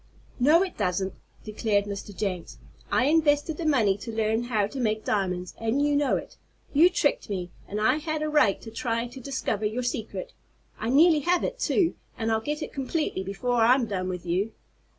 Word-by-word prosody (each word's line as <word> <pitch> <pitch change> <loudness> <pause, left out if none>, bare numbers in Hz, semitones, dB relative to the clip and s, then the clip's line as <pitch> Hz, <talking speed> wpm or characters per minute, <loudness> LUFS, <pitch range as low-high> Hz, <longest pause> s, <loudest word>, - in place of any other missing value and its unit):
"No, 305 +8 +5
it 370 - -6
doesn't!" 185 +1 0 0.3
declared 210 -1 0
Mr. 200 0 -6
Jenks. 185 -4 -3 0.3
"I 250 - +3
invested 300 0 +2
the 330 - -2
money 225 -10 +3
to 230 - -6
learn 220 +1 0
how 220 -4 +1
to 265 +7 -6
make 215 -3 0
diamonds, 180 -3 -1
and 225 +4 0
you 290 0 +2
know 285 -1 +2
it! - - -9 0.4
You 320 +5 +7
tricked 305 - 0
me, 180 -3 -3 0.2
and 205 - -3
I 255 +6 +3
had 310 0 -2
a - - 0
right 295 -10 +3
to 225 - -8
try 230 +1 -1
to 245 +2 -9
discover 230 -5 -2
your 235 +4 -3
secret! 245 - -4 0.5
I 225 - -2
nearly 310 +4 +6
have 350 +5 +1
it, - - -3
too, 345 -4 +2 0.2
and 225 0 -1
I'll 220 0 +1
get 295 +5 -3
it - - -7
completely 275 - -2
before 230 +5 -1
I'm 245 +2 +5
done 185 -4 -3
with 180 -1 -5
you!" 190 +6 -1
230 Hz, 195 wpm, -26 LUFS, 205-295 Hz, 0.5 s, You